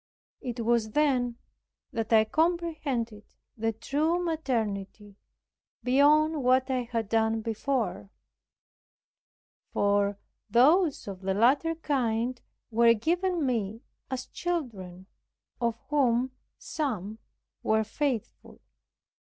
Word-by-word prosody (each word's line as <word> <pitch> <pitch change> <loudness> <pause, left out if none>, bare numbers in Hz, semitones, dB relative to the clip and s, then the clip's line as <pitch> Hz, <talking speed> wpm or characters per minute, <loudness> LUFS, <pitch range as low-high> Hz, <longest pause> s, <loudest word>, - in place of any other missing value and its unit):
It 245 -2 -4
was 230 -2 +1
then 255 -5 +2 0.6
that 225 -1 -3
I 220 -1 +7
comprehended 300 -8 -1 0.2
the 225 0 0
true 300 +9 0
maternity 220 - -3 0.7
beyond 295 +3 +4
what 260 +1 +3
I 250 -2 -1
had 230 -3 -1
done 225 +1 +1
before; 225 - -2 1.6
for 200 0 +1 0.3
those 290 - +4
of 195 -2 -7
the 190 0 -1
latter 275 +9 +3
kind 250 -5 -1 0.3
were 230 +1 +5
given 345 - 0
me 225 -2 -2 0.3
as 260 -1 -3
children, 210 - -4 0.5
of 235 -1 0
whom 260 -3 +2 0.3
some 220 - -4 0.4
were 220 0 +2
faithful. 240 +1 -3
240 Hz, 95 wpm, -28 LUFS, 220-290 Hz, 1.6 s, I